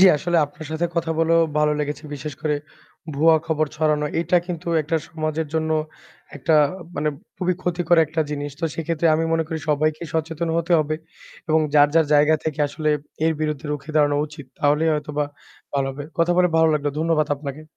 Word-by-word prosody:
জী, 190 - +9
আসলে 175 +3 -1
আপনার 150 +1 -11
সাথে 170 +2 0
কথা 165 -1 0
বলেও 165 +1 +4 0.2
ভালো 150 0 +3
লেগেছে 150 +1 -4
বিশেষ 145 +2 -6
করে 150 -1 +1 0.6
ভুয়া 160 +2 +5
খবর 155 -1 +1
ছড়ানো। 150 -1 +1 0.2
এটা 180 +1 +2
কিন্তু 175 -1 -6 0.2
একটা 160 +2 0
সমাজের 155 0 -2
জন্য 160 0 0 0.7
একটা 155 +3 +1 0.4
মানে 150 - 0 0.3
খুবই 180 0 0
ক্ষতিকর 175 -1 +1
একটা 160 +1 -2
জিনিস। 145 0 -3
তো - - 0
সেক্ষেত্রে 165 0 -1
আমি 160 +1 +1
মনে 165 0 +2
করি 160 0 -3
সবাইকেই 155 +2 0
সচেতন 160 +1 -1
হতে 170 +1 0
হবে 155 0 0 0.5
এবং 160 0 +4
যার, 145 0 +7
যার 165 -2 +5
জায়গা 150 +2 +5
থেকে 155 -2 -3
আসলে 155 +1 -1 0.3
এর 160 - +3
বিরুদ্ধে 150 -1 -2
রুখে 145 +1 -6
দাঁড়ানো 145 -1 +3
উচিত 145 -1 -11
তাহলেই 150 +2 +3
হয়তোবা 150 0 -2 0.5
ভালো 135 -1 +1
হবে। 140 +1 -7
কথা 170 +1 +3
বলে 180 0 +4
ভালো 160 0 +5
লাগলো। 145 -1 0
ধন্যবাদ 160 -1 +2
আপনাকে। 140 +1 -7
155 Hz, 180 wpm, -22 LUFS, 150-165 Hz, 0.7 s, জী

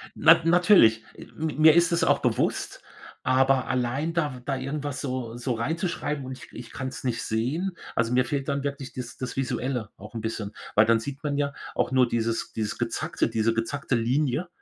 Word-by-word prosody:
Nat 165 0 +6
natürlich, 165 - +5 0.3
mi 160 0 -2
mir 155 0 +7
ist 170 0 +4
es 170 - +2
auch - - +3
bewusst, - - -1 0.4
aber 130 0 +3
allein 130 +6 -1
da 150 -5 0
w - - -10
da 135 - -1
irgendwas 140 +1 -4
so 125 -4 -4
so 125 +1 -2
reinzuschreiben 150 +2 -2
und 130 0 -6
ich - - -13
k - - -18
ich 120 -1 -9
kann's 130 0 -6
nicht 125 -3 -1
sehen 155 - -2 0.2
also, 115 +1 +1
mir 125 +1 +4
fehlt 140 0 -2
dann 140 -1 -1
wirklich 140 -3 -4
dies 125 -1 -7
das 130 -2 -5
Visuelle 125 -3 -2
auch 105 +4 -12
'n 115 - -3
bisschen, 110 -2 -4 0.2
weil 105 - +6
dann 115 0 +4
sieht 140 +5 -7
man 145 -1 -1
ja 140 -1 0 0.2
auch - - 0
nur 130 -1 +4
dieses 115 0 -2
dieses 110 -2 -3
Gezackte - - -1
diese 115 0 +1
gezackte 125 +4 -1
Linie, 130 +7 0
130 Hz, 195 wpm, -26 LUFS, 115-145 Hz, 0.4 s, mir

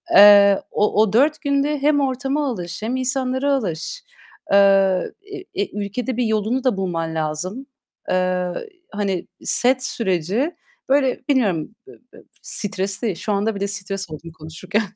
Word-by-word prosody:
Eee, 200 -1 +8
o 210 0 +2
o 215 -1 -1
4 295 +5 +3
günde 285 +1 +1
hem 290 0 +3
ortama 275 +2 -1
alış 175 -4 -5
hem 235 +4 -1
insanlara 260 +1 0
alış, 230 - -3 0.5
eee, 195 -2 +4
e 395 - -7
e 200 - -2 0.2
ülkede 245 +4 -4
bir 250 - +1
yolunu 220 +4 0
da 250 -6 +1
bulman 165 -4 -2
lazım. 160 - -3 0.4
Eee, 185 0 +1 0.4
hani, 200 -4 -2 0.2
set 255 +1 +2
süreci, 215 - -1 0.3
böyle, 270 -2 +2
bilmiyorum, 220 - +1
b - - -12 0.2
b - - -15 0.2
stresli. 200 0 -3
Şu 210 - -4
anda 205 +2 0
bile 200 0 -2
stres 195 -1 -4
oldum 160 +2 -9
konuşurken. 160 +7 -3
205 Hz, 140 wpm, -21 LUFS, 185-260 Hz, 0.5 s, Eee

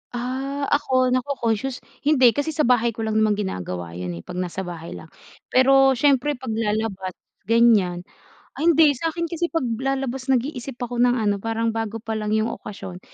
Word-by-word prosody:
Ah, 265 +3 -3
ako 255 -3 +2
nako-concious? 255 -1 -1 0.2
Hindi, 265 -5 +5
kasi 290 +6 -2
sa 305 - +2
bahay 235 -2 +2
ko 225 - -4
lang 220 0 0
naman 215 -1 +3
ginagawa 90 - -4
yun, 90 0 -5
eh, 85 - -9
pag 180 - -6
nasa 185 +1 -3
bahay 170 -2 -7
lang. 160 - -11 0.4
Pero 270 +1 +5
siyempre 285 0 +3
paglalabas 220 -5 -2 0.4
gan'yan. 210 -6 +3 0.6
Ay 320 - +1
hindi 320 -2 +6
sakin 330 +5 -3
kasi 340 +1 -1
paglalabas 265 -2 -2
nag-iisip 265 0 -1
ako 245 0 -4
ng 245 0 +4
ano 205 -4 0
parang 225 +2 -1
bago 225 0 -4
pa 225 - -5
lang 215 0 -1
yung 220 +1 +1
okasyon, 185 -3 -8
235 Hz, 165 wpm, -23 LUFS, 210-270 Hz, 0.6 s, hindi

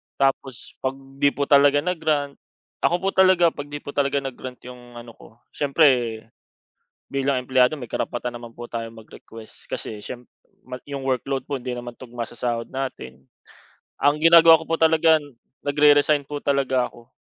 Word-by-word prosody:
Tapos 135 -2 -2
pag 130 0 -2 0.2
di 145 - +4
po 145 - -1
talaga 145 +1 +4
na-grant, 155 -5 -1 0.4
ako 175 - +2
po 195 - +2
talaga 185 -3 +4
kapag 145 0 -8
di 145 0 -8
po 145 - -7
talaga 140 -1 0
na-grant 130 -1 -8
'yung 125 -1 -12
ano 120 0 -10
ko 110 - -18 0.2
siyempre, 130 -6 +2 0.9
bilang 135 -2 0
empleyado 130 +3 +3
may 125 -5 -10
karapatan 120 0 -3
naman 115 -1 -12
po 120 - -8
tayong 115 -1 -5
mag-request, 115 0 -14
kasi 105 -1 -6
siyem 125 +3 -8 0.4
mag 125 0 -8
'yong 140 -1 -5
workload 135 0 -2
po 140 -3 -4
hindi 125 0 -5
naman 120 0 -7
tugma 120 -2 -6
sa - - -13
sahod 120 -1 -2
natin. 70 - -6 0.8
Ang 145 +1 +3
ginagawa 165 0 +7
ko - - -9
po 165 - +1
talaga, 160 0 +4 0.5
nag-re-resign 145 0 +3
po 145 -1 -6
talaga 135 -3 0
ako, 120 0 -17
135 Hz, 165 wpm, -23 LUFS, 120-145 Hz, 0.9 s, ginagawa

